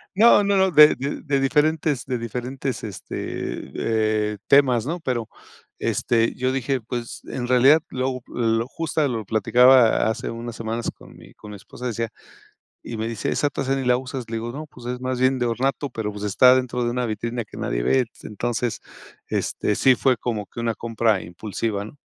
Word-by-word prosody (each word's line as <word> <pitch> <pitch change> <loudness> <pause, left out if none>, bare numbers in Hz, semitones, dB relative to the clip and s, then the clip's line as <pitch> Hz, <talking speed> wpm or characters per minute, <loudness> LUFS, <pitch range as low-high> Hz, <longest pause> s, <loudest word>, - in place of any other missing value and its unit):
no 215 +1 +6
no 200 0 +2
no, 190 0 +3
de 150 -1 +8
de 140 +3 -4
de 140 -3 0
diferentes 150 -1 +1
de 130 -1 -2
diferentes, 125 +2 -4
este, 105 -4 -5 0.2
eh, 110 -1 0
temas, 130 -4 +4
¿no? 170 +4 -3
Pero, 120 -6 -2 0.5
este 115 -1 +1
yo 130 +1 0
dije 135 0 -1
pues 120 +1 -6
en 120 -2 -4
realidad 130 +5 +5
lo 130 0 -2
lo 115 0 0
justa 155 0 -1
lo 115 -4 -3
platicaba 120 +3 +5
hace 110 - -3
unas 115 0 -6
semanas 115 +1 -3
con - - -16
mi - - -16
con 105 - -11
mi 105 - -8
esposa 125 +5 -11
decía 115 0 -2 0.7
y 115 - -6
me 110 +1 -2
dice: 115 -3 -3
"Esa 145 - 0
tasa 135 -1 -1
ni 135 - -2
la 125 - +4
usas" 130 -2 -6
le 115 - -2
digo: 115 +1 -4
"No 150 +4 -7
pues 125 -4 -13
es 125 0 -4
más 130 0 -2
bien 130 +1 +3
de 120 - 0
ornato" 135 +4 -1
pero 110 -3 -3
pues 105 0 -7
está 125 +5 +6
dentro 125 -1 -1
de 120 - 0
una 125 0 -1
vitrina 115 +2 -3
que - - -14
nadie - - -2
ve 130 - +2 0.2
entonces 120 +2 -3 0.5
este 105 - -1
sí 130 - +5
fue 130 0 +2
como 110 -2 -3
que - - -14
una 115 -1 -1
compra 115 -3 0
impulsiva, 100 +4 -4
¿no? 110 - -11
120 Hz, 195 wpm, -23 LUFS, 115-135 Hz, 0.7 s, de